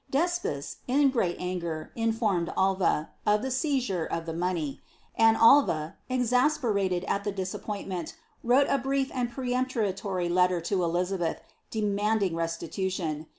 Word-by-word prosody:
D''Espes, 310 Hz, -, -1 dB
in 275 Hz, +2 st, +4 dB
great 190 Hz, -9 st, 0 dB
anger, 170 Hz, -3 st, -4 dB
informed 220 Hz, -6 st, 0 dB
Alva, 190 Hz, -5 st, +1 dB
of 210 Hz, 0 st, +2 dB
the 265 Hz, -, -2 dB
seizure 255 Hz, -, 0 dB
of 165 Hz, +1 st, -3 dB
the 165 Hz, -, -4 dB
money; 170 Hz, -4 st, -2 dB, 0.3 s
and 225 Hz, 0 st, +5 dB
Alva, 200 Hz, -, +5 dB
exasperated 245 Hz, -7 st, +1 dB
at 200 Hz, -, -1 dB
the 205 Hz, -, -1 dB
disappointment, 190 Hz, -2 st, -5 dB, 0.3 s
wrote 255 Hz, +4 st, +4 dB
a 275 Hz, -, +2 dB
brief 270 Hz, +1 st, -1 dB
and 245 Hz, -2 st, -1 dB
peremptory 225 Hz, -8 st, -1 dB
letter 180 Hz, 0 st, +3 dB
to 180 Hz, +2 st, -1 dB
Elizabeth, 175 Hz, 0 st, -1 dB, 0.3 s
demanding 210 Hz, -3 st, 0 dB
restitution. 165 Hz, -1 st, -3 dB
195 Hz, 125 wpm, -28 LUFS, 175-245 Hz, 0.3 s, and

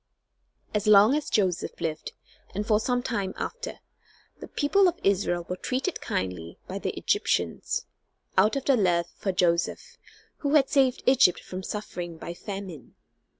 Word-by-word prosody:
As 210 Hz, 0 st, -1 dB
long 210 Hz, +3 st, +7 dB
as 300 Hz, 0 st, -1 dB
Joseph 185 Hz, -4 st, 0 dB
lived, 155 Hz, -1 st, -4 dB, 0.4 s
and 205 Hz, +2 st, -2 dB
for 215 Hz, -1 st, +3 dB
some 245 Hz, +2 st, 0 dB
time 200 Hz, -7 st, -2 dB
after, -, -, -5 dB, 0.6 s
the -, -, -8 dB
people 380 Hz, +7 st, +3 dB
of 355 Hz, -, -1 dB
Israel 180 Hz, -3 st, +1 dB
were 180 Hz, -, -3 dB
treated 260 Hz, -, -2 dB
kindly 90 Hz, -3 st, -3 dB
by -, -, -4 dB
the -, -, -2 dB
Egyptians, 85 Hz, -2 st, 0 dB, 0.5 s
out 210 Hz, +6 st, +4 dB
of 275 Hz, -, -2 dB
their 275 Hz, -3 st, +4 dB
love 175 Hz, -4 st, +2 dB
for 195 Hz, -, -2 dB
Joseph, 180 Hz, -, 0 dB, 0.4 s
who 285 Hz, +1 st, 0 dB
had 275 Hz, -3 st, +5 dB
saved 265 Hz, -3 st, +3 dB
Egypt 255 Hz, -9 st, +5 dB
from 185 Hz, 0 st, -7 dB
suffering 180 Hz, -4 st, -5 dB
by 170 Hz, -, -6 dB
famine. 185 Hz, -, -8 dB
200 Hz, 150 wpm, -27 LUFS, 175-260 Hz, 0.6 s, long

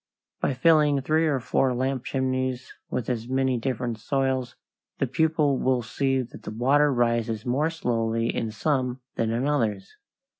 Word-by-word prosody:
By 135 Hz, -, 0 dB
filling 150 Hz, 0 st, +4 dB
three 155 Hz, +4 st, +2 dB
or 140 Hz, -3 st, +1 dB
four 125 Hz, +1 st, +1 dB
lamp 130 Hz, 0 st, -1 dB
chimneys 130 Hz, -1 st, -2 dB, 0.2 s
with 120 Hz, -, -3 dB
as 120 Hz, -2 st, -2 dB
many 130 Hz, -1 st, +1 dB
different 120 Hz, -2 st, -2 dB
soils, 130 Hz, 0 st, -1 dB, 0.4 s
the -, -, +1 dB
pupil 150 Hz, +1 st, +1 dB
will 130 Hz, -2 st, +1 dB
see 135 Hz, +3 st, 0 dB
that 120 Hz, -, -12 dB
the -, -, -7 dB
water 135 Hz, +7 st, +3 dB
rises 115 Hz, -3 st, 0 dB
more 140 Hz, +6 st, +1 dB
slowly 115 Hz, -7 st, -1 dB
in 115 Hz, -, -1 dB
some 125 Hz, +2 st, -1 dB
than 115 Hz, -, -1 dB
in 120 Hz, +5 st, 0 dB
others. 110 Hz, -10 st, -1 dB
130 Hz, 155 wpm, -26 LUFS, 115-135 Hz, 0.4 s, filling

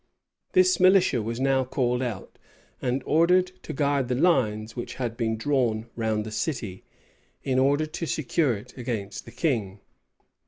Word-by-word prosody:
This 185 Hz, 0 st, +4 dB
militia 185 Hz, -, +5 dB
was 115 Hz, +2 st, -4 dB
now 135 Hz, 0 st, +2 dB
called 125 Hz, -1 st, 0 dB
out, 115 Hz, -7 st, -5 dB, 0.4 s
and 130 Hz, +1 st, -1 dB
ordered 180 Hz, +3 st, +3 dB
to -, -, -7 dB
guard 140 Hz, -2 st, +1 dB
the 125 Hz, -, 0 dB
lines 115 Hz, -9 st, +1 dB
which 120 Hz, -, -5 dB
had 120 Hz, -3 st, -3 dB
been 110 Hz, -2 st, -1 dB
drawn 115 Hz, -3 st, 0 dB
round 110 Hz, -2 st, -1 dB
the 110 Hz, -, -6 dB
city, 110 Hz, -, -3 dB, 0.6 s
in 130 Hz, -1 st, +1 dB
order 140 Hz, +3 st, +3 dB
to 160 Hz, +2 st, -5 dB
secure 150 Hz, -5 st, 0 dB
it 125 Hz, +5 st, -13 dB
against 110 Hz, -6 st, -5 dB
the -, -, -11 dB
king. 110 Hz, -, -1 dB
125 Hz, 155 wpm, -26 LUFS, 110-145 Hz, 0.6 s, militia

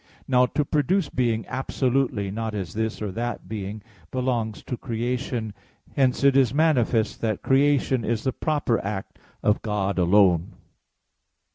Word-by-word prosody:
Now 125 Hz, -1 st, +4 dB
to 150 Hz, -, +2 dB
produce 155 Hz, +6 st, +1 dB
being 115 Hz, -3 st, 0 dB
absolutely, 130 Hz, -5 st, -1 dB
not 110 Hz, +1 st, -3 dB
as 95 Hz, -5 st, -4 dB
this 110 Hz, 0 st, -2 dB
or 105 Hz, -, -3 dB
that 120 Hz, +4 st, -4 dB
being, 105 Hz, -1 st, -5 dB, 0.3 s
belongs 120 Hz, -4 st, -2 dB
to 125 Hz, -, -4 dB
creation. 120 Hz, -2 st, -3 dB, 0.4 s
Hence 130 Hz, -1 st, +2 dB
it 140 Hz, -1 st, +5 dB
is 135 Hz, -2 st, +3 dB
manifest 125 Hz, -8 st, +2 dB
that 110 Hz, -3 st, -1 dB
creation 135 Hz, -2 st, +3 dB
is 110 Hz, 0 st, -1 dB
the 130 Hz, -, 0 dB
proper 145 Hz, -7 st, 0 dB
act 100 Hz, -1 st, -5 dB, 0.2 s
of 105 Hz, 0 st, +2 dB
God 100 Hz, -3 st, -1 dB
alone. 90 Hz, -1 st, +4 dB
115 Hz, 140 wpm, -25 LUFS, 105-130 Hz, 0.4 s, it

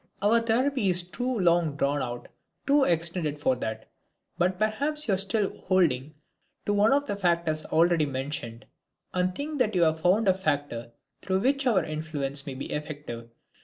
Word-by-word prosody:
Our 225 Hz, +3 st, +4 dB
therapy 235 Hz, -1 st, +1 dB
is 180 Hz, -1 st, +2 dB
too 245 Hz, +6 st, -3 dB
long 170 Hz, -4 st, +2 dB
drawn 140 Hz, 0 st, 0 dB
out, 120 Hz, -1 st, -5 dB, 0.4 s
too 280 Hz, 0 st, +4 dB
extended 165 Hz, -, 0 dB
for 130 Hz, -3 st, +1 dB
that. 110 Hz, -2 st, -5 dB, 0.5 s
But 180 Hz, +1 st, 0 dB
perhaps 280 Hz, +9 st, -1 dB
you 205 Hz, -, +2 dB
are -, -, +2 dB
still 200 Hz, +1 st, +2 dB
holding 155 Hz, -6 st, +1 dB, 0.5 s
to 205 Hz, -, +1 dB
one 205 Hz, +2 st, +4 dB
of 285 Hz, +1 st, +2 dB
the 205 Hz, -, -3 dB
factors 170 Hz, -5 st, 0 dB
already 165 Hz, -1 st, +2 dB
mentioned, 130 Hz, -3 st, -5 dB, 0.5 s
and 180 Hz, 0 st, 0 dB
think 295 Hz, +1 st, -4 dB
that 220 Hz, -4 st, +1 dB
you 175 Hz, -, +4 dB
have 160 Hz, 0 st, +1 dB
found 195 Hz, +5 st, +3 dB
a 190 Hz, -, +6 dB
factor 145 Hz, -10 st, -2 dB, 0.3 s
through 190 Hz, 0 st, 0 dB
which 275 Hz, +3 st, +1 dB
our 220 Hz, -6 st, +3 dB
influence 150 Hz, -3 st, 0 dB
may 135 Hz, -, -5 dB
be 130 Hz, -, -6 dB
effective. 145 Hz, -6 st, -6 dB
175 Hz, 170 wpm, -27 LUFS, 145-215 Hz, 0.5 s, a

